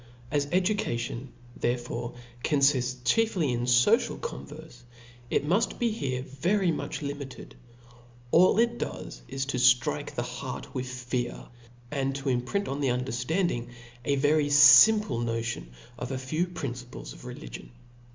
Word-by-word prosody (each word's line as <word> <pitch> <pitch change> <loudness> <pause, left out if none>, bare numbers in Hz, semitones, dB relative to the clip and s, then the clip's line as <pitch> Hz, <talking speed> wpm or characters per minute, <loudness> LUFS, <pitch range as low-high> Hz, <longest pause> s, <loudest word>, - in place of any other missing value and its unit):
As 145 -1 +1
education 155 - -1 0.2
therefore 120 0 -3 0.3
confifts 130 -4 +2
chiefly 185 - +2
in 120 0 -1
focial 125 - +3
converfe, 155 - -8 0.5
it - - +1
muft 185 +9 +1
be 235 -2 +1
here 130 - -3
very 175 +8 0
much 155 - -4
limited; 140 -2 -7 0.8
all 185 +3 +5
it 235 +1 +2
does - - -6
is 135 +2 -3
to 135 -2 -2
ftrike 125 0 +2
the - - -1
heart - - -6
with 130 0 -3
fear, 125 -1 -4 0.4
and 135 -2 -1
to 140 0 -2
imprint 130 +11 -1
on 140 +2 -3
the 140 - +1
underftanding 125 +3 -1 0.3
a 140 +3 +1
very 145 +2 +3
fimple 145 - +7
notion 115 - -3 0.3
of 125 - -4
a 130 - -2
few 155 +7 -1
principles 125 -8 -7
of - - -14
religion. - - -9
135 Hz, 135 wpm, -28 LUFS, 125-165 Hz, 0.8 s, fimple